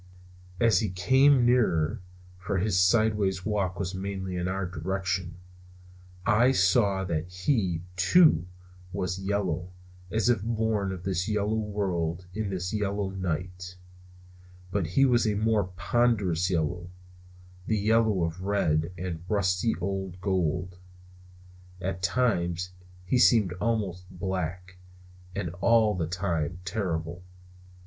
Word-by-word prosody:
As 115 -5 +4
he 105 - -1
came 130 +8 +4
nearer 110 -6 +2 0.4
for 95 +1 -2
his 95 0 +1
sidewise 100 -1 +2
walk 100 -4 -1
was 95 -1 -2
mainly 95 -1 -4
in 90 0 -2
our 95 +1 -2
direction 90 +1 -3 0.9
I 120 +4 +4
saw 95 -1 +3
that 85 -2 -2
he, 90 - 0
too, 95 - +5 0.4
was 90 -1 -3
yellow, 95 -3 -2 0.4
as 110 +2 +1
if 120 -5 +3
born 110 -3 -1
of 90 -2 -6
this 90 -1 -1
yellow 105 0 0
world 95 -5 -2
in 110 0 -2
this 90 0 -3
yellow 100 -2 -1
night; 90 0 -4 0.9
but 95 -5 0
his 135 +12 +3
was 120 -3 +3
a 105 - +1
more 105 -1 +2
ponderous 100 -4 +1
yellow; 85 0 -1 0.8
the 110 - +1
yellow 110 -2 +2
of 85 +2 -3
red 85 -5 +1
and 85 -2 -5
rusty 100 +1 +1
old 95 0 -4
gold. 90 -1 -1 1.0
At 95 0 -3
times 90 -4 0 0.3
he 125 +7 +2
seemed 110 -8 +5
almost 100 -5 -2
black; 90 -1 -4 0.6
and 100 -4 -2
all 115 -2 +4
the 85 -4 -2
time 85 -2 -2
terrible. 85 -3 -3
95 Hz, 125 wpm, -27 LUFS, 90-105 Hz, 1.0 s, too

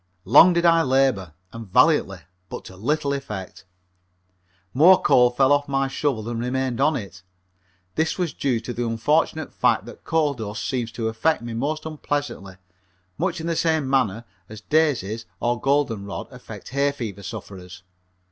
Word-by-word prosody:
Long 145 - +7
did 170 0 +1
I 165 -1 +5
labor 130 - +1 0.2
and 115 -2 -8
valiantly - - +3 0.3
but - - -7
to 95 - -11
little 140 +8 -1
effect. 105 -10 -7 1.1
More 175 +8 +7
coal 125 -1 +4
fell 135 +3 +3
off 145 0 +1
of - - -16
my 135 0 +1
shovel 135 -4 -2
than 115 +1 -4
remained 125 +1 -2
on 155 +2 +3
it. 95 -6 -7 0.7
This 160 +1 -1
was 175 -4 -2
due 130 -5 0
to 120 +2 -6
the 120 - -3
unfortunate 145 +7 0
fact - - +1
that - - -12
coal 155 -3 +1
dust 110 -3 -5
seems 120 -3 -2
to 115 -2 -3
affect 115 +5 0
me 120 -1 -6
most 150 +7 -3
unpleasantly, 145 -10 -4 0.6
much 175 0 -1
in 160 - -5
the 170 0 -1
same 160 -4 +1
manner 120 -5 0 0.2
as 110 -1 -10
daisies 115 - 0
or 120 0 -1
golden 135 -7 0
rod 100 - -6
affect - - -11
hay 140 +2 +1
fever 110 -8 -6
sufferers. 95 -4 -9
130 Hz, 165 wpm, -23 LUFS, 110-150 Hz, 1.1 s, Long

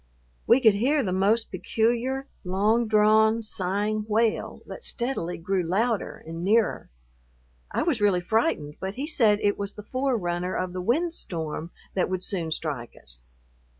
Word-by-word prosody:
We 235 - +6
could 220 -5 +6
hear 270 +8 +2
the 185 -4 -1
most 205 +5 +2
peculiar, 240 +7 0 0.2
long 210 +5 +2
drawn, 220 +1 +4
sighing 210 +2 -2
wail 220 +1 0
that - - -9
steadily 235 -9 -1
grew 185 +3 0
louder 205 +5 -1
and 165 +1 -6
nearer. 215 +4 +2 0.8
I - - -1
was 300 -9 0
really 200 -3 +4
frightened, 175 - 0
but 190 +1 -4
he 275 - -3
said 225 -9 +4
it 205 0 +2
was 200 0 -4
the 210 - -9
forerunner 190 -8 -1
of 185 -1 -2
the 185 - -3
windstorm 180 - -2 0.2
that 185 - 0
would 185 -1 -2
soon 170 -5 -2
strike 145 -7 -4
us. - - -7
210 Hz, 150 wpm, -26 LUFS, 180-230 Hz, 0.8 s, We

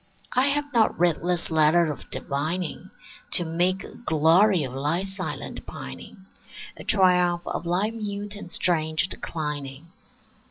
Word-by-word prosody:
I 255 +2 +4
have 290 0 -1
not 225 -2 +3
writ 175 -2 +3
this 175 -1 -1
letter 160 +1 +4
of 145 - -9
divining 160 +6 -3 0.4
To 175 - +2
make 175 +4 +1
a - - -10
glory 170 0 +3
of 130 -2 -5
thy 150 +7 0
silent 190 -1 -5
pining, 190 -2 -9 0.5
A - - -10
triumph 180 -3 +3
of - - -4
thy 185 +5 +1
mute 205 -2 -5
and 205 -4 -8
strange 160 -3 +1
declining. 150 0 -5
175 Hz, 135 wpm, -25 LUFS, 160-195 Hz, 0.5 s, I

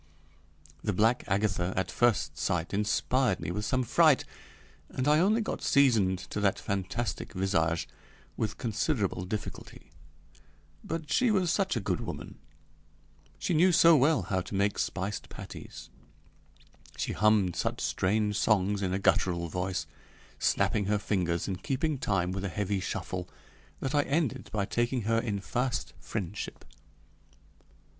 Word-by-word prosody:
The 105 - 0
black 115 +6 +2
Agatha 100 -2 0
at 95 -1 -1
first 105 -12 +2
sight 85 +3 -1
inspired 105 +2 +1
me - - -4
with 105 +4 -3
some 130 +3 +1
fright, 140 +3 +4 0.6
and 130 +2 -2
I 150 +1 +5
only 210 +6 +3
got 220 - -3
seasoned 115 -10 +4
to - - -2
that 100 -2 +2
fantastic 100 +2 -3
visage 85 -4 0 0.5
with 110 -1 -2
considerable 110 - -1
difficulty; 105 -4 -7 0.9
but 160 -3 -5
she 250 - +3
was 185 -5 +2
such 195 -4 +1
a - - +1
good 100 - -1
woman - - -7 1.0
she - - -1
knew 175 +4 +5
so 170 -1 +7
well 150 +3 +3
how 95 -3 -1
to 90 +3 -7
make 100 +1 +1
spiced 100 +2 -3
patties, - - -10 1.1
she - - -2
hummed 105 -4 +3
such - - -1
strange 105 +2 0
songs 100 -1 +2
in 95 -2 -1
a - - +1
guttural 85 -3 +1
voice, 90 -2 -2 0.5
snapping 105 - +1
her 105 +1 +2
fingers 90 -5 -1
and 95 -2 -4
keeping 145 +1 -1
time 90 -5 0
with 95 +1 -4
a 100 - -1
heavy 100 +1 -1
shuffle, 90 -1 -4 0.5
that 135 +1 -3
I 145 - +4
ended 145 -2 -1
by 100 -2 0
taking 120 +3 0
her 115 +2 +2
in 105 -4 -2
fast 120 +2 -2
friendship. 100 -2 -5
105 Hz, 145 wpm, -29 LUFS, 95-130 Hz, 1.1 s, so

